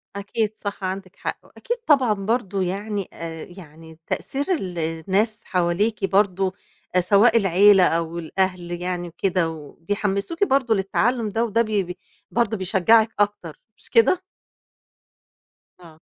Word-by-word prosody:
أكيد 210 +2 -2
صح، 200 -1 -6
عندِك 185 0 -5
حق. - - -4
وأكيد 480 0 -5
طبعًا 265 -7 +4
برضه 200 -1 -1
يعني 200 +2 -3
آآ 165 -1 -7
يعني 160 -2 -14
تأثير 280 +1 -2
ال 180 - -5
الناس 190 +7 -1
حواليكِ 190 +4 0
برضه 195 -1 +1 0.4
آآ 180 - +5
سواء 205 +6 +4
العيلة 195 0 +5
أو 165 0 0
الأهل 175 0 -2
يعني 175 -1 -3
وكده 175 0 0
وبيحمّسوكِ 200 - -3
برضه 265 - +2
للتعلُّم 215 +4 0
ده 225 +3 0
وده 230 +1 +1
ب - - 0
ب 190 -4 -1 0.4
برضه 225 -2 +1
بيشجّعِك 200 +4 +4
أكتر 205 - -1 0.2
مش - - -18
كده؟ 375 -5 +4 1.6
آه. 160 -3 -16
195 Hz, 130 wpm, -23 LUFS, 175-220 Hz, 1.6 s, آآ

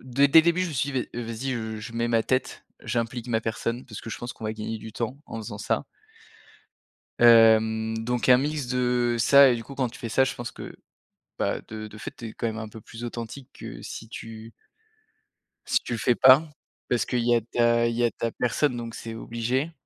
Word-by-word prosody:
dès 135 +3 +3
dès 160 +3 +8
le - - -6
début 170 +2 +2
je 180 - -1
me - - -6
suis 135 +2 -1
dit: 130 -2 -2
«Vas-y, 120 +2 -4
heu, 110 -1 -4
je 115 - -8
mets 115 0 0
ma 115 -1 +2
tête, 130 +2 -2 0.2
j'implique 115 0 -2
ma 110 -1 +1
personne 115 +2 -3
parce 110 -5 -8
que 115 - -7
je - - -5
pense 120 0 -6
qu'on 110 - -11
va 110 - -1
gagner 110 +1 -4
du 110 0 -10
temps 120 +4 -3
en 115 - -6
faisant - - -7
ça». - - -1 1.4
Hem, 110 -1 +5
donc 125 +1 -1
un 125 - +8
mix 145 -1 -2
de 125 -1 +1
ça 140 +4 +7
et 120 - +2
du 115 - -6
coup 140 - -10
quand 130 -2 -1
tu - - -12
fais 115 - -5
ça, 130 +4 +3
je 130 - -2
pense 120 0 -6
que, - - -9 0.6
bah, - - 0
de 110 -1 -6
de 105 0 -12
fait - - -7
tu 115 - -7
es 110 - -9
quand 115 - -3
même 110 -1 -3
un 110 -1 -5
peu 110 +1 -11
plus 115 +3 -10
authentique 120 +3 -7
que - - -9
si 115 - -8
tu 115 0 -9 1.1
si - - +2
tu 120 - -4
le - - -1
fais 120 +1 +2
pas, 130 +4 +7 0.5
parce 120 - +1
qu'il 120 -2 -1
y 120 0 +4
a 115 - +2
ta 115 +1 +2
il 115 - -2
y 120 - +1
a 120 - +3
ta 115 +2 -3
personne 125 +1 0
donc 115 -1 -6
c'est 115 -1 -7
obligé 120 +7 -2
120 Hz, 235 wpm, -26 LUFS, 115-125 Hz, 1.4 s, dès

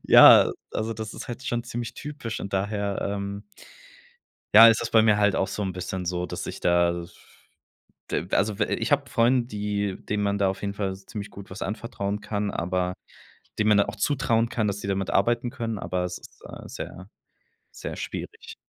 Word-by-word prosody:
Ja, - - +9 0.2
also 110 +1 -2
das 110 -1 -6
ist - - -7
halt 120 +2 -6
schon 120 -2 -2
ziemlich 120 -1 -5
typisch 145 -6 -6
und 100 - -6
daher, 100 0 -1
ähm 100 +1 -4 1.1
ja, 115 +2 +11
ist 115 - +4
es - - -2
bei 110 - +6
mir 105 -2 +4
halt 105 -2 +3
auch 95 - +1
so 105 - -3
'n 95 - -2
bisschen 90 0 -4
so 90 0 -1
dass - - -5
ich - - -6
da 85 0 +3
das 85 0 -7 1.0
d - - -1
also, 105 +1 +1
we 105 - +3
ich 115 - -3
habe 140 -3 +2
Freunde, 120 0 +3
die 105 -3 -2
denen 105 0 -3
man 100 0 +1
da 100 -1 +2
auf 95 - -4
jeden 100 0 -2
Fall 95 -2 -2
ziemlich 100 +1 -8
gut 100 0 -11
was 95 - -9
anvertrauen 105 -1 -3
kann, 105 -1 -2
aber 90 +1 -1 0.7
denen 105 - +3
man 105 - +5
dann 100 - +4
auch - - -4
zutrauen 115 -1 +1
kann, 110 -3 -1
dass 100 0 -2
sie 100 - -5
damit 95 -1 -1
arbeiten 120 +5 +2
können, 115 -4 -4
aber 90 -1 -2
es 90 0 -4
ist, - - -17
äh, - - -10
sehr, 95 +1 -8 0.6
sehr - - -6
schwierig. - - -7
105 Hz, 200 wpm, -26 LUFS, 95-115 Hz, 1.1 s, ja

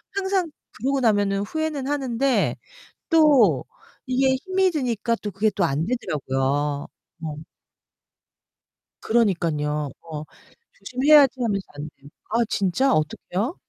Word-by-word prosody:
항상 380 -3 0 0.2
그러고 270 +5 -1
나면은 205 -4 +2
후회는 300 +4 -3
하는데 270 -2 0 0.6
또 275 - +5 0.4
이게 260 +1 +2
힘이 375 +6 +1
드니까 240 -6 -1
또 210 - -3
그게 205 +3 +1
또 205 - -1
안 155 +1 0
되더라고요. 145 - -1 0.3
어. 155 -2 -4 1.6
그러니깐요. 160 -10 0
어, 155 -2 -7 0.5
조심해야지 265 +5 +4
하면서 200 -5 -1
안 145 +1 -6
돼요. 140 - -16 0.2
아 230 +2 +2
진짜? 205 +8 +1
어떻게요? 185 - -1
225 Hz, 250 characters per minute, -23 LUFS, 165-270 Hz, 1.6 s, 또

